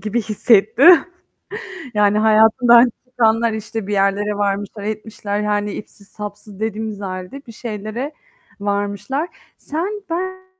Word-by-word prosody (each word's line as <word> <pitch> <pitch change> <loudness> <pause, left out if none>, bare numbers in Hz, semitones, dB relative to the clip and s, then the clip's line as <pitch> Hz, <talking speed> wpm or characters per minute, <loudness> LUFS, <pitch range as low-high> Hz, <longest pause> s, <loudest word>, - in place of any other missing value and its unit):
gibi 215 +4 -1
hissettim, 225 - +5 0.9
yani, 210 0 +3
hayatından 220 +3 +5 0.2
çıkanlar, 230 -1 +2
işte, 220 -1 -5
bir 210 - -4
yerlere 200 +1 +1
varmışlar, 205 +1 -2
etmişler, 210 -1 -4
yani, 210 -1 -1
ipsiz 200 -1 -10
sapsız 210 -1 -9
dediğimiz 220 -1 -3
halde 185 +7 -6
bir 230 - -10
şeylere 225 +5 -5 0.5
varmışlar. 205 - -2 0.3
Sen 385 +7 -4
ben 375 +2 -4
215 Hz, 115 wpm, -19 LUFS, 205-235 Hz, 0.9 s, hissettim